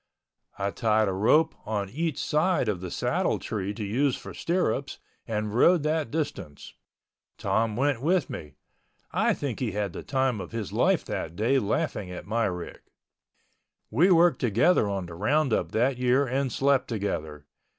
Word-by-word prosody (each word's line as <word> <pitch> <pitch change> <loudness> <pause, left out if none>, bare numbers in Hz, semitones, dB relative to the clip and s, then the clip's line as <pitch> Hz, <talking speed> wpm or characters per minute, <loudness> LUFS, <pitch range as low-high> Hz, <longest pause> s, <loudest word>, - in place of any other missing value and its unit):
I 100 0 -1
tied 110 -2 +2
a 95 - 0
rope 115 +12 +3
on 105 -3 -2
each 155 - -2
side 155 -3 +1
of 100 -5 -1
the 90 - -5
saddle - - 0
tree 100 -3 -3
to 110 - -5
use 125 +6 +1
for - - -9
stirrups 170 -5 -1 0.3
and 105 -2 -2
rode 165 +7 +4
that 155 -3 0
distance. 100 - -5 0.6
Tom 110 -1 0
went 135 0 +1
with 170 +1 +2
me—I 75 -2 -4
think - - -4
he - - -2
had 105 -1 -2
the - - -6
time 130 -5 0
of - - -9
his 110 -4 -4
life - - +2
that 80 - -4
day 120 +8 +2
laughing 105 - -2
at 90 - -7
my 115 +2 0
rig. 90 -2 -5 1.1
We 160 - +4
worked 170 -5 +5
together 120 - +3
on 95 -2 -2
the 85 - -9
roundup 130 - +1
that 125 +3 +1
year 125 +3 +3
and 130 +1 -1
slept 135 +1 +2
together. 80 -9 -4
115 Hz, 160 wpm, -27 LUFS, 100-140 Hz, 1.1 s, worked